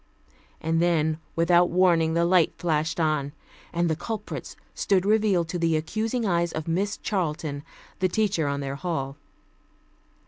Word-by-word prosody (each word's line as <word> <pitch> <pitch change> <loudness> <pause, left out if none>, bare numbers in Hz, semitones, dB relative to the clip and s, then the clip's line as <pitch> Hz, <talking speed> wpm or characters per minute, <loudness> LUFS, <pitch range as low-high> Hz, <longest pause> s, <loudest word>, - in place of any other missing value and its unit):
And 165 +1 +1
then, 160 -2 +2 0.2
without 175 +1 +4
warning 170 -3 +3
the 170 0 +3
light 175 -1 +3
flashed 160 0 -1
on, 155 -3 0 0.4
and 170 0 +1
the 160 - +1
culprits 220 +6 -6 0.2
stood 195 -2 +1
revealed 205 -5 +2
to 175 - -3
the 165 -1 +2
accusing 220 +9 -2
eyes 170 -3 +1
of 160 0 -5
Miss 195 +5 0
Charlton, 155 -6 -2 0.4
the 185 0 +2
teacher 200 -6 +1
on 140 0 -1
their 140 0 -4
hall. 140 -5 -3
170 Hz, 145 wpm, -26 LUFS, 155-185 Hz, 0.4 s, without